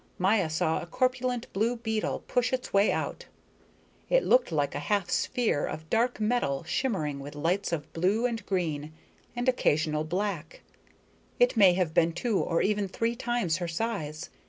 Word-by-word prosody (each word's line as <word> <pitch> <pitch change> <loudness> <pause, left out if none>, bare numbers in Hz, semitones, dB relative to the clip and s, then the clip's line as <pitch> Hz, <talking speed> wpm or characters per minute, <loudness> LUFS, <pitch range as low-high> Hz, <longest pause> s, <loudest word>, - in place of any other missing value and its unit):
Maya 190 -2 +2
saw 160 0 0
a - - -8
corpulent 255 +4 0
blue 225 +5 +1
beetle 220 -2 -2
push 245 0 +1
its 260 -1 -3
way 200 +1 +4
out. - - -3 0.8
It - - +4
looked 250 -7 +3
like 145 -3 0
a - - -3
half 185 +5 -1
sphere 230 -12 +1
of 155 0 -7
dark 240 +1 +1
metal, 215 - 0
shimmering 165 - -1
with 145 +2 -8
lights 175 +7 0
of 155 -3 -4
blue 195 +8 +1
and 230 -2 -2
green 155 -5 -2 0.4
and 245 +1 -2
occasional 155 -11 +2
black. 175 -1 -3 0.8
It - - +4
may 195 -5 +7
have 175 -3 0
been 165 0 +3
two 210 +3 0
or 165 - +1
even 210 -1 +1
three 230 +5 -1
times 235 -9 0
her 175 -2 -3
size. 165 -4 -3
195 Hz, 165 wpm, -28 LUFS, 160-235 Hz, 0.8 s, may